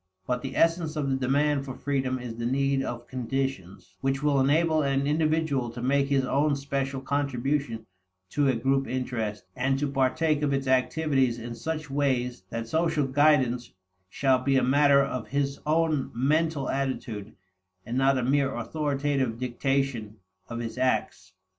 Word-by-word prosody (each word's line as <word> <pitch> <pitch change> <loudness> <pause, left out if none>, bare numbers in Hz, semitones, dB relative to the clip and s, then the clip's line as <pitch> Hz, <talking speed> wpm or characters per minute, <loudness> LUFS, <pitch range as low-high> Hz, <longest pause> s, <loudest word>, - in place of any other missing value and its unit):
But 125 +3 -1
the 135 - -6
essence 165 -1 +2
of 140 -3 -1
the - - +2
demand 140 +2 +1
for 130 -2 -7
freedom 135 -2 -1
is 125 -2 -6
the 115 - -3
need 135 +1 +1
of 120 -2 -5
conditions 125 -8 -4
which 135 +1 -1
will 145 -2 +3
enable 155 +4 +3
an 140 -1 +1
individual 155 -4 +1
to 120 +1 -8
make 140 +2 +2
his 135 -2 +2
own 145 +3 +2
special 140 -1 -3
contribution 135 -3 -1 0.5
to 145 -1 +2
a 130 - +3
group 135 +3 +1
interest, 120 -5 -3
and 135 +2 +1
to 145 +1 0
partake 145 +3 +1
of 145 -2 +1
its 135 0 -1
activities 130 -1 +2
in 120 0 -6
such 155 +4 -4
ways 130 -5 0
that 115 0 -4
social 160 +1 +1
guidance 130 -3 +2 0.4
shall 130 +4 +2
be 135 +1 +2
a - - +2
matter 140 +1 +5
of 130 -4 -4
his 140 0 -1
own 155 -3 +1
mental 150 +2 +1
attitude, 120 -6 -3 0.5
and 120 - -4
not 135 +1 +3
a 130 - 0
mere 135 +1 +1
authoritative 140 -1 -1
dictation 125 -3 -1 0.3
of 115 - -5
his 120 +1 -5
acts. 130 -6 -1
135 Hz, 160 wpm, -27 LUFS, 125-145 Hz, 0.5 s, matter